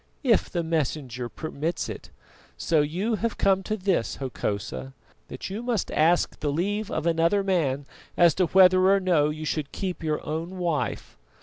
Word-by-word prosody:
"If 235 Hz, -6 st, +3 dB
the 170 Hz, -2 st, -2 dB
Messenger 140 Hz, -6 st, -2 dB
permits 160 Hz, +3 st, -3 dB
it! -, -, -8 dB, 0.5 s
So 160 Hz, -3 st, +2 dB
you 185 Hz, +10 st, -1 dB
have 230 Hz, +2 st, -2 dB
come 195 Hz, -1 st, +3 dB
to 215 Hz, +2 st, -3 dB
this, 185 Hz, -, 0 dB
Hokosa, 100 Hz, -, -4 dB, 0.3 s
that -, -, -7 dB
you 210 Hz, +4 st, -4 dB
must 240 Hz, -5 st, -1 dB
ask 170 Hz, +3 st, +2 dB
the 145 Hz, -, -1 dB
leave 205 Hz, +7 st, -1 dB
of 160 Hz, -, -3 dB
another 170 Hz, +4 st, +2 dB
man 150 Hz, -8 st, 0 dB, 0.3 s
as 170 Hz, -2 st, +6 dB
to 185 Hz, +1 st, +1 dB
whether 185 Hz, +1 st, +6 dB
or 200 Hz, 0 st, +5 dB
no 170 Hz, -6 st, +2 dB
you 155 Hz, +1 st, -5 dB
should 155 Hz, -2 st, -2 dB
keep 185 Hz, -3 st, -4 dB
your 155 Hz, -2 st, -2 dB
own 165 Hz, +5 st, -4 dB
wife! 170 Hz, -4 st, -2 dB
170 Hz, 170 wpm, -26 LUFS, 150-190 Hz, 0.5 s, as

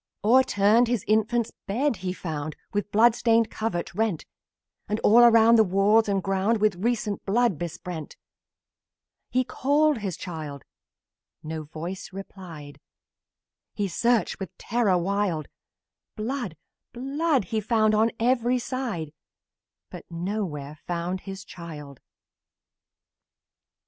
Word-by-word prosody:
O'erturned 230 Hz, -1 st, +4 dB
his 235 Hz, -5 st, 0 dB
infant's 220 Hz, +2 st, +1 dB, 0.2 s
bed 240 Hz, +4 st, 0 dB
he 180 Hz, 0 st, -3 dB
found, 155 Hz, -4 st, -5 dB, 0.2 s
The 205 Hz, -, +2 dB
blood 220 Hz, +3 st, +4 dB
stained 230 Hz, -1 st, +2 dB
covert 215 Hz, -6 st, -3 dB
rent; 210 Hz, -4 st, -1 dB, 0.6 s
And 210 Hz, +1 st, 0 dB
all 225 Hz, +3 st, +6 dB
around, 230 Hz, -1 st, +7 dB
the 220 Hz, -, +7 dB
walls 205 Hz, +3 st, +3 dB
and 195 Hz, -2 st, 0 dB
ground, 195 Hz, +4 st, +1 dB
With 210 Hz, -3 st, +2 dB
recent 230 Hz, -3 st, -1 dB
blood 225 Hz, -4 st, +1 dB
besprent. 170 Hz, -1 st, -6 dB, 1.1 s
He 255 Hz, +1 st, +2 dB
called 285 Hz, +1 st, +1 dB
the 195 Hz, -2 st, -2 dB
child 155 Hz, -5 st, -7 dB, 0.8 s
no 155 Hz, 0 st, -5 dB
voice 170 Hz, +7 st, -7 dB
replied; 180 Hz, -7 st, -10 dB, 1.0 s
He 205 Hz, -2 st, -1 dB
searched, 235 Hz, +5 st, +1 dB
with 195 Hz, -5 st, -7 dB
terror 220 Hz, -5 st, +1 dB
wild; 185 Hz, -3 st, -1 dB, 0.7 s
Blood! 220 Hz, -, -4 dB, 0.4 s
Blood! 275 Hz, +2 st, 0 dB
He 220 Hz, -, +1 dB
found 215 Hz, 0 st, +2 dB
on 220 Hz, +2 st, +4 dB
every 245 Hz, +1 st, +2 dB
side, 235 Hz, -, -4 dB, 0.8 s
But -, -, -10 dB
nowhere 170 Hz, -5 st, -4 dB
found 175 Hz, +2 st, -2 dB
the 195 Hz, -, -4 dB
child! 155 Hz, -7 st, -10 dB
205 Hz, 115 wpm, -26 LUFS, 175-235 Hz, 1.1 s, around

